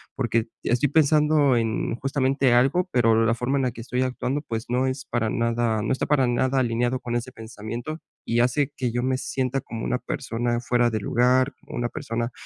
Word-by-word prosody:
porque 115 Hz, -3 st, 0 dB, 0.2 s
estoy 125 Hz, +4 st, +1 dB
pensando 150 Hz, -2 st, +4 dB
en 115 Hz, 0 st, -1 dB
justamente 135 Hz, -1 st, +1 dB
algo, 135 Hz, +10 st, +3 dB
pero 115 Hz, -2 st, +3 dB
la 115 Hz, +1 st, +2 dB
forma 125 Hz, +4 st, -1 dB
en -, -, 0 dB
la 125 Hz, -, 0 dB
que 115 Hz, -, -9 dB
estoy 125 Hz, +2 st, -2 dB
actuando, 130 Hz, +2 st, -1 dB
pues, 115 Hz, -5 st, -4 dB
no 125 Hz, +2 st, +1 dB
es 130 Hz, +1 st, -3 dB
para 115 Hz, -2 st, -1 dB
nada, 115 Hz, -2 st, 0 dB
no -, -, -1 dB
está 130 Hz, -, -1 dB
para 140 Hz, -3 st, +3 dB
nada 130 Hz, +2 st, +1 dB
alineado 120 Hz, +1 st, 0 dB
con 120 Hz, -1 st, -4 dB
ese 120 Hz, +2 st, -3 dB
pensamiento, 115 Hz, +5 st, -7 dB, 0.3 s
y 115 Hz, -, +1 dB
hace 130 Hz, +4 st, +1 dB
que 125 Hz, -3 st, -2 dB
yo 120 Hz, +1 st, -1 dB
me 130 Hz, 0 st, +1 dB
sienta 130 Hz, 0 st, -2 dB
como 115 Hz, -1 st, -6 dB
una 125 Hz, -, 0 dB
persona 120 Hz, -2 st, -2 dB
fuera 120 Hz, 0 st, +2 dB
de 110 Hz, -2 st, -2 dB
lugar, 125 Hz, +5 st, +2 dB
una 120 Hz, 0 st, -3 dB
persona 115 Hz, +1 st, -3 dB
125 Hz, 200 wpm, -24 LUFS, 115-130 Hz, 0.3 s, pensando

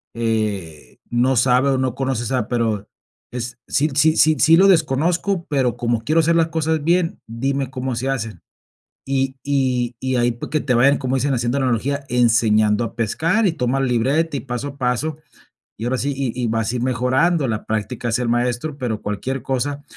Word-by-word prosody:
eh, 105 Hz, -9 st, -3 dB
no 125 Hz, +2 st, +2 dB
sabe, 125 Hz, +2 st, +3 dB
o, 135 Hz, -, +2 dB
no 130 Hz, -2 st, 0 dB
conoce, 130 Hz, -3 st, -2 dB
o -, -, -5 dB
sea, 125 Hz, -2 st, -1 dB
pero 110 Hz, -4 st, -1 dB, 0.4 s
es: 120 Hz, 0 st, -6 dB
"sí 150 Hz, +1 st, +1 dB
sí 155 Hz, +2 st, +3 dB
sí 155 Hz, 0 st, +4 dB
sí 165 Hz, +1 st, +6 dB
lo 195 Hz, +1 st, +6 dB
desconozco, 170 Hz, +3 st, +1 dB
pero 130 Hz, -5 st, 0 dB
como 120 Hz, -1 st, 0 dB
quiero 155 Hz, +7 st, +3 dB
hacer 165 Hz, +1 st, +2 dB
las 165 Hz, 0 st, +3 dB
cosas 160 Hz, -1 st, -1 dB
bien, 170 Hz, +1 st, +1 dB
dime 135 Hz, +3 st, -2 dB
cómo 130 Hz, -1 st, -3 dB
se 130 Hz, +3 st, -2 dB
hacen". 110 Hz, -5 st, -4 dB, 0.7 s
Y 135 Hz, 0 st, 0 dB
y 130 Hz, -4 st, 0 dB
y, 130 Hz, 0 st, -1 dB
ahí 120 Hz, 0 st, +2 dB
pues, 120 Hz, -, -7 dB
que 155 Hz, -, 0 dB
te 125 Hz, -, 0 dB
vayan, 135 Hz, +4 st, +4 dB
como 130 Hz, -1 st, -2 dB
dicen, 135 Hz, +2 st, 0 dB
haciendo 120 Hz, +2 st, 0 dB
analogía, 135 Hz, +3 st, -1 dB
enseñando 110 Hz, -2 st, +3 dB
a 115 Hz, -, -5 dB
pescar, 165 Hz, -, +1 dB
y 170 Hz, -, 0 dB
toma 125 Hz, -2 st, -1 dB
libreta, 135 Hz, +5 st, +1 dB
y -, -, -2 dB
paso 125 Hz, +2 st, -4 dB
a 140 Hz, -, -12 dB
paso. 135 Hz, +4 st, -1 dB, 0.6 s
Y 110 Hz, -, -7 dB
ahora 130 Hz, +1 st, 0 dB
sí, 140 Hz, +2 st, -1 dB
y 135 Hz, -3 st, -1 dB
y 120 Hz, -, 0 dB
vas 115 Hz, 0 st, -1 dB
a -, -, -4 dB
ir 120 Hz, -, -3 dB
mejorando 130 Hz, +6 st, +1 dB
la 110 Hz, -1 st, -3 dB
práctica, 110 Hz, +3 st, -3 dB
hace 120 Hz, +2 st, 0 dB
al 120 Hz, -, -1 dB
maestro, 125 Hz, +5 st, -1 dB
pero 120 Hz, -6 st, -3 dB
cualquier 125 Hz, +5 st, -3 dB
cosa 140 Hz, +2 st, -2 dB
130 Hz, 200 wpm, -20 LUFS, 120-145 Hz, 0.7 s, sí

